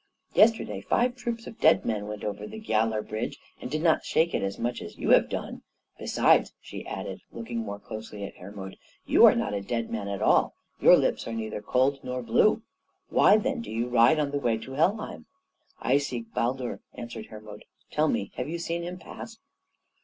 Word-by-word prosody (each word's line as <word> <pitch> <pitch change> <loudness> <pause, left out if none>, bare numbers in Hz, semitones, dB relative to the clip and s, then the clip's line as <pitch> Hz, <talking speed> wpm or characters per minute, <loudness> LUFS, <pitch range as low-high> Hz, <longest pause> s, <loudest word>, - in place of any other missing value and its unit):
Yesterday 210 - +3
five 245 - +1
troops 235 -2 -4
of 225 - -10
dead 95 - +5
men 105 -2 -2
went 105 -1 -6
over 105 - -4
the 220 +1 -8
Giallar 110 - 0
Bridge 110 +2 -3 0.2
and - - -5
did 155 +3 -2
not 165 -2 +3
shake 165 +1 +1
it 100 - 0
so - - -12
much 120 +1 -2
as - - -9
you - - 0
have - - +6
done. - - -5 0.4
Besides," - - +3
she - - -9
added, - - -5
looking 115 0 -5
more 100 -2 -4
closely 105 0 -8
at 100 - -6
Hermod, 95 0 -9 0.3
"you - - +7
are - - +6
not - - -1
a 100 - -1
dead 115 +3 -3
man 105 -3 -3
at 100 -1 -3
all. - - +3 0.2
Your - - +8
lips - - 0
are 115 - -4
neither 110 -2 -4
cold 130 +6 +2
nor 125 0 -4
blue. 125 - +3 0.5
Why, 210 - +6
then, 260 +2 -1
do - - -8
you 115 +2 -2
ride 120 +6 +5
on 145 -2 0
the 145 - -1
way 120 -4 +1
to 120 +4 -9
Helheim?" 160 - -1 0.5
"I 135 +3 +3
seek 120 -5 -5
Baldur," 125 +1 -1
answered 120 -2 -7
Hermod. 105 -1 -11 0.3
"Tell 155 +1 +2
me, 100 - -1
have 125 +3 -3
you 170 - -3
seen 170 0 -3
him 175 +1 -5
pass?" 225 +4 -10
120 Hz, 200 wpm, -27 LUFS, 110-160 Hz, 0.5 s, Your